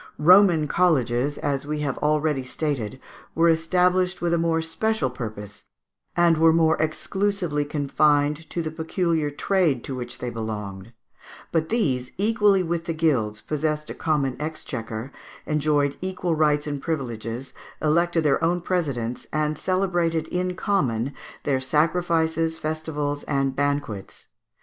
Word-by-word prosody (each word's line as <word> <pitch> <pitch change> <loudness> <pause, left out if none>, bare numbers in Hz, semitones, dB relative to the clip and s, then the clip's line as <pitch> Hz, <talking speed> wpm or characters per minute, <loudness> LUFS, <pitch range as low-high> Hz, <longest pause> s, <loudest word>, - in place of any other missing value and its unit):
Roman 175 -1 +6
colleges, 140 -5 +2
as 140 0 -2
we 150 0 -2
have 140 -3 -1
already 150 -2 +1
stated, 130 -3 -3 0.4
were 170 +1 +4
established 180 +3 +2
with 170 -1 0
a - - +3
more 165 -1 +1
special 165 - -1
purpose, 105 -4 -7 0.5
and 170 -2 +4
were 165 0 +6
more 160 -1 +4
exclusively 175 0 -1
confined 145 +1 +1
to 170 - -2
the 155 - -3
peculiar 160 -1 0
trade 155 -4 +1
to 135 - -5
which 125 -2 -5
they 125 - -4
belonged; 105 -2 -5 0.6
but 160 -1 0
these, 135 - 0
equally 205 -2 +3
with 170 -1 -2
the 165 -2 -2
guilds, 120 -10 +1
possessed 150 0 -2
a - - -4
common 140 -5 0
exchequer, 125 -6 -5 0.3
enjoyed 150 -2 +1
equal 180 -2 -2
rights 150 -2 +2
and 145 -2 -4
privileges, 125 -4 -4 0.3
elected 170 +2 +2
their 150 0 +2
own 175 +2 +2
presidents, 140 -10 -2
and 155 0 0
celebrated 175 -4 0
in 180 0 -1
common 140 - 0 0.3
their 135 -2 +1
sacrifices, 160 +2 +1
festivals, 155 -2 -3
and 135 -2 0
banquets. 140 -8 -3
155 Hz, 135 wpm, -24 LUFS, 135-170 Hz, 0.6 s, Roman